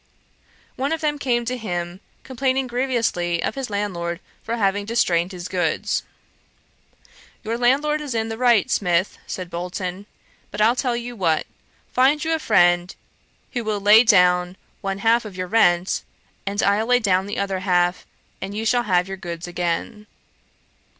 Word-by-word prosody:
One 275 +3 -1
of 325 0 -1
them 295 -1 -1
came 240 -3 0
to 250 +2 -2
him, 175 -6 -4 0.2
complaining 260 +1 -1
grievously 235 -9 -1
of - - -1
his 270 -3 -5
landlord 180 -5 -3 0.2
for 230 +1 -3
having 200 -1 +1
distrained 185 -5 +1
his 180 -1 -6
goods.' 180 -4 -1 1.4
'Your 225 +2 -2
landlord 280 +6 +2
is 280 -5 -4
in 225 0 0
the 225 0 -5
right, 240 -6 +3
Smith, 180 0 +1
(said 180 -2 -6
Bolton). 180 +3 -5 0.4
But 205 - -7
I'll 225 +3 +4
tell 250 -2 0
you 240 0 -6
what: 165 -7 +1 0.5
find 270 +4 +3
you 325 0 0
a 320 - 0
friend 175 - +3 0.6
who 240 -3 -3
will 215 -2 -1
lay 210 +2 +7
down 180 -4 +4 0.2
one 195 0 -2
half 230 +3 +3
of 205 -4 -9
your 185 - -2
rent, 180 -3 +2 0.5
and 200 +1 -1
I'll 205 +3 +2
lay 250 0 +5
down 195 -4 +1
the 205 - -4
other 195 -1 -1
half; 180 -1 +1 0.3
and 195 +2 -5
you 220 - -2
shall 240 +1 +2
have 180 0 +3
your 195 0 -6
goods 175 -2 -6
again.' 175 +5 -3
205 Hz, 165 wpm, -22 LUFS, 180-240 Hz, 1.4 s, lay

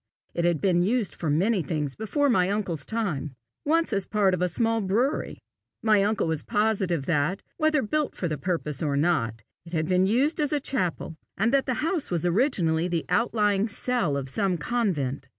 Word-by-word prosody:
It 170 - -1
had 170 -3 +2
been 175 -1 +2
used 220 +2 0
for 160 - -3
many 190 +7 +2
things 150 -2 -2
before 285 - 0
my 185 -8 +3
uncle's 190 -7 -2
time 155 - -3 0.3
once 330 +3 +2
as 200 -1 0
part 205 -3 +2
of 180 - -1
a 180 - +2
small 225 +5 +1
brewery. 225 +9 0 0.5
My 215 -2 +4
uncle 215 +2 +1
was 160 -2 -1
positive 205 - 0
that, 170 +3 0
whether 310 -3 +2
built 300 +7 -1
for 180 - -2
the 155 -3 -3
purpose 155 -3 -2
or 145 -3 0
not, 115 -9 0 0.2
it 170 +1 -13
had 155 -1 0
been 185 +1 +3
used 275 - +2
as 295 - +1
a 295 - +1
chapel, 180 - -3 0.2
and 225 +6 +1
that 275 0 +2
the 255 - 0
house 335 -3 -1
was 175 -2 -1
originally 175 - +1
the 170 -2 -2
out 235 0 +1
lying 205 -1 +2
cell 225 - -1
of 135 -1 -4
some 190 +5 0
convent. 150 - -2
190 Hz, 195 wpm, -26 LUFS, 160-230 Hz, 0.5 s, My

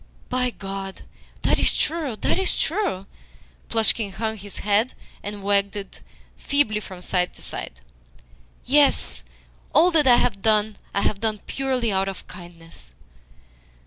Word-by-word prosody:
"By 250 0 +1
God, 195 -3 -7 0.4
that - - +2
is - - +3
true, 305 -6 0
that 285 - 0
is 380 - +1
true." 325 - 0 0.6
Plushkin 220 -2 +2
hung 220 +2 -2
his 205 -1 -8
head, 210 +4 +2 0.3
and 205 -1 -7
wagged 200 0 +2
it 200 -2 -7 0.4
feebly 275 -7 +2
from 185 -3 -10
side 180 -1 0
to - - -9
side. - - -6 0.8
"Yes, 285 +2 +4 0.5
all 350 +3 +6
that 310 -4 +3
I 245 - +8
have 230 -5 +1
done 215 -1 +2
I 200 - 0
have 200 - 0
done 215 -1 -1
purely 260 -4 -1
out 190 0 0
of 195 - -6
kindness." 165 - -12
210 Hz, 145 wpm, -23 LUFS, 195-255 Hz, 0.8 s, I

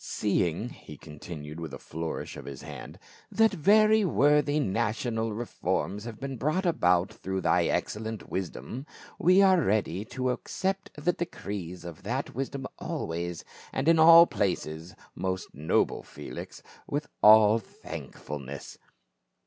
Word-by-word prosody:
Seeing," 100 +1 0
he 75 - -12
continued 75 0 -9
with 80 -4 -6
a - - -7
flourish 80 +1 -5
of - - -9
his 70 -2 -8
hand, - - -9 0.3
"that 225 -1 +4
very 215 +5 +5
worthy 150 -3 +3
national 115 0 -1
reforms 105 -2 -2
have 115 -3 -7
been 135 -1 -5
brought 155 - 0
about 90 - +2
through 95 0 -4
thy - - +3
excellent 110 0 -2
wisdom, 95 - -5 0.3
we 185 +3 +6
are 190 -2 +5
ready 100 - 0
to 130 +2 -2
accept 190 +9 -3
the 165 +4 +1
decrees 95 - -6
of 85 -2 -8
that 125 +7 -3
wisdom 135 +1 -4
always, 85 +1 -4 0.3
and 135 +3 -2
in 165 -1 +5
all 165 +1 +10
places, 85 - -2 0.2
most 95 0 -3
noble 75 +3 +1
Felix, - - -9 0.2
with 145 +1 -2
all 110 +1 +7
thankfulness. 70 - -8
110 Hz, 135 wpm, -28 LUFS, -, 0.3 s, all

